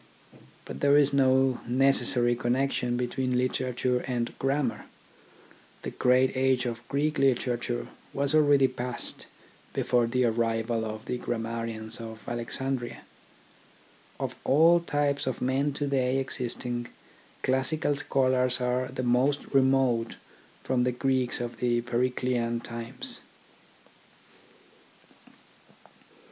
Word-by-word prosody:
But - - -7
there 145 0 +5
is 145 -1 +4
no 130 -1 +3
necessary 125 -1 +3
connection 125 0 0
between 125 +1 -1
literature 125 0 0
and 120 -2 -2
grammar. 135 -2 -1 1.0
The - - -4
great 130 +1 +3
age 130 -1 +2
of 115 -1 -3
Greek 150 +2 0
literature 120 - 0 0.3
was 140 +1 0
already 145 -3 +5
past 125 -1 -5 0.5
before 120 -1 +2
the 125 +1 +1
arrival 115 0 0
of 110 0 -6
the 125 - -3
grammarians 115 -1 -4
of 110 -2 -9
Alexandria. 120 +1 -3 1.2
Of - - -3
all 165 +5 +5
types 145 -4 -1
of 130 - -2
men 135 +3 +1
to 145 - -2
day 135 -2 +1
existing, 125 -2 -3 0.6
classical 145 +4 +1
scholars 130 -3 +1
are 125 +1 0
the 130 - -5
most 125 +4 +2
remote 130 -4 +3 0.5
from 130 -1 +1
the 125 - +1
Greeks 130 0 0
of 120 -1 -5
the 120 -1 +1
Periclean 120 -1 0
times. 115 +2 -4
125 Hz, 110 wpm, -28 LUFS, 120-135 Hz, 1.2 s, there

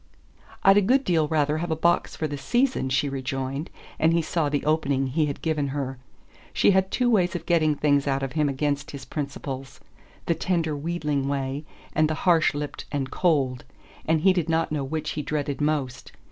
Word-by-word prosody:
"I'd 195 +1 +7
a - - +6
good 260 +7 +3
deal 165 - +2
rather 150 0 +1
have 175 +1 -3
a 160 - +1
box 170 +2 +1
for 155 - -2
the 145 - -4
season," 240 - 0
she 140 +2 +1
rejoined, 135 +2 -3 0.3
and 160 +2 +4
he 170 - +3
saw 155 -2 0
the 145 -1 -1
opening 145 -3 +1
he 150 +4 0
had 140 - -5
given 155 -3 0
her. 135 -2 -4 0.5
She - - +4
had 190 0 +2
two 250 +4 +1
ways 185 -7 +2
of 170 -1 -4
getting 155 -3 +3
things 145 -1 +2
out 135 0 0
of 135 - -3
him 150 -1 +1
against 140 +1 -1
his 140 -2 -8
principles; 135 -2 -5 0.5
the 170 - +2
tender 165 -2 -1
wheedling 150 -3 -2
way, 140 +1 -2 0.3
and 155 0 +3
the 155 - 0
harsh 165 -5 +4
lipped 145 0 -5
and 135 -2 -2
cold 140 -8 +1 0.4
and 160 -1 +1
he 190 +2 +5
did 175 -3 -1
not 165 0 +1
know 150 -2 -1
which 155 +3 -3
he 150 - -3
dreaded 145 -1 -3
most. 140 -4 -1
150 Hz, 200 wpm, -25 LUFS, 140-165 Hz, 0.5 s, I'd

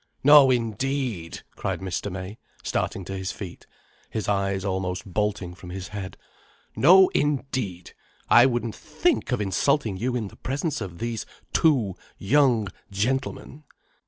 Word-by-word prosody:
"No 145 -1 +8
indeed!" 120 -5 -1
cried - - -3
Mr. 95 +1 -3
May, 95 +3 -7 0.2
starting 95 - -2
to 95 - -5
his 95 0 -3
feet, 95 -4 -9 0.4
his 110 - -3
eyes 100 -1 0
almost 95 -2 -2
bolting 100 -2 -2
from 90 0 -11
his 90 0 -6
head. 100 -3 -6 0.6
"No 185 +6 +7
indeed! 130 -11 -2 0.4
I 120 +2 +7
wouldn't 120 -3 -1
think 345 - -1
of 125 - +1
insulting 105 +2 +1
you 125 +5 -1
in 110 -5 -2
the - - -17
presence 140 +3 -2
of 90 -4 -6
these 115 0 -4 0.3
two 130 - +3 0.2
young 120 -2 +3 0.2
gentlemen." 130 +7 -2
105 Hz, 135 wpm, -25 LUFS, 95-130 Hz, 0.6 s, No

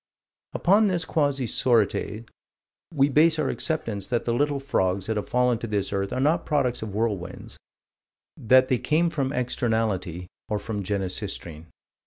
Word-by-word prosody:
Upon 205 +4 +4
this 175 -3 -1
quasi 140 -5 0
sorites, 115 -1 +1 0.7
we 140 -4 +3
base 155 +3 +4
our - - 0
acceptance 110 - -3
that 120 -2 -1
the 120 - 0
little 145 +3 +1
frogs 95 -9 0
that 110 - -2
have 105 - -4
fallen 125 -1 +2
to 115 - -5
this 105 -2 -2
earth 100 0 -1
are - - -2
not 155 +5 +2
products 135 -5 0
of 105 -3 -6
whirlwinds: 100 -5 -3 0.8
that 130 +3 +4
they 130 -2 +1
came 165 +2 +1
from 140 -4 -1
externality, 110 - -1 0.2
or 105 - 0
from 105 0 -4
Genesistrine. 95 -4 -4
120 Hz, 155 wpm, -25 LUFS, 100-140 Hz, 0.8 s, Upon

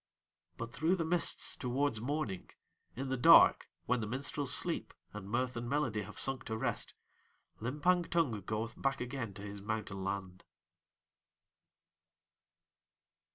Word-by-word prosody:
But 115 0 -5
through 160 +5 +2
the 165 -3 -1
mists 175 +1 0
towards 125 -2 0
morning, 125 -8 -2 0.5
in 135 +2 -3
the 130 - 0
dark 120 - +7 0.2
when 125 0 +1
the 110 - -2
minstrels 135 +3 -2
sleep - - -1 0.2
and 105 -2 -7
mirth 125 +3 0
and 120 0 -4
melody 125 -7 0
have 105 +1 -9
sunk 135 -2 -1
to 110 -1 -3
rest, - - -2 0.6
Limpang 150 +9 +1
Tung 140 -12 +1
goeth 110 +4 -4
back 135 0 +1
again 125 -5 -4
to 100 - -8
his 100 -1 -7
mountain 105 -2 -3
land. 95 -1 -4
120 Hz, 135 wpm, -34 LUFS, 105-140 Hz, 0.6 s, dark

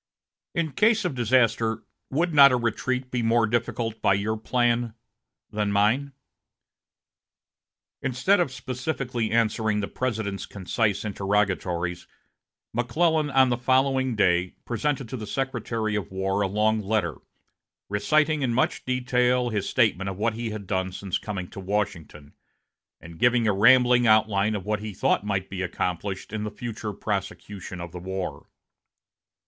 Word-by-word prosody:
In 165 -3 0
case 215 +4 +3
of 175 - 0
disaster, 115 -2 +2 0.3
would 165 +5 0
not 140 -2 +8
a - - +3
retreat 125 +2 -2
be 125 - -1
more 115 0 +3
difficult 115 0 -2
by 100 - +4
your 105 +3 -1
plan 120 0 0 0.6
than 105 -1 -1
mine?" 115 +8 +2 1.9
Instead 130 +11 +2
of 170 -7 +1
specifically 125 -2 -3
answering 110 -2 +1
the 100 - -2
President's 105 -6 -3
concise 100 +2 -1
interrogatories, 95 -4 -1 0.7
McClellan, 150 +6 +1
on 135 -2 +4
the 120 - +1
following 130 0 +2
day, 90 -3 +2
presented 135 +2 -1
to 130 - -5
the 110 -2 -7
Secretary 115 -4 -2
of 105 - -3
War 95 +1 -1
a 100 - +2
long 110 +3 +1
letter, 95 - -1 0.7
reciting 150 +9 +1
in 120 -3 0
much 130 - 0
detail 125 -1 +1
his 105 -3 -2
statement 100 -6 +2
of 95 - -6
what 110 +2 0
he 115 +1 -4
had 105 -2 -6
done 95 0 -1
since 95 0 -3
coming 95 -4 -5
to - - -8
Washington, 90 -7 -4 0.7
and 85 -1 -12
giving 120 -2 +3
a 105 - +3
rambling 120 +3 +5
outline 110 -1 +3
of 95 -3 -5
what 105 0 -1
he 105 -1 -7
thought - - +1
might 100 -2 -2
be 95 -2 -5
accomplished 90 +2 -3
in 110 -1 -2
the 105 - -2
future 115 -2 -5
prosecution 100 -2 -5
of 85 -1 -7
the 90 - -7
war. 90 -5 -5
110 Hz, 145 wpm, -25 LUFS, 100-125 Hz, 1.9 s, not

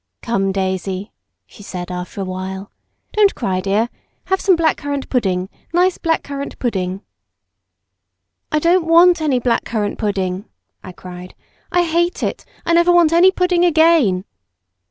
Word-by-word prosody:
"Come, 195 -4 0
Daisy," 190 +1 -3 0.3
she 150 - -16
said 180 -3 -6
after 180 +3 -5
a - - -2
while 190 +1 -6 0.4
"Don't 415 -2 +3
cry, 190 -6 -1
dear. 200 +4 +1 0.4
Have 380 0 -1
some 380 -2 +4
black 330 -1 +2
currant 285 -1 -4
pudding—nice 250 - -1
black 325 -1 0
currant 280 0 -6
pudding." 190 -5 -2 1.5
"I 305 - +2
don't 335 +2 +2
want 340 +1 +6
any 290 -5 +1
black 245 -1 0
currant 210 -3 -3
pudding!" 195 -2 -2 0.4
I 185 - -8
cried. 180 0 -11 0.4
"I 355 0 +3
hate 345 +1 0
it! - - -3 0.2
I 335 - +1
never 345 +1 +4
want 345 -2 +4
any 350 +3 +6
pudding 360 -2 +1
again!" 315 - +3
240 Hz, 145 wpm, -18 LUFS, -, 1.5 s, want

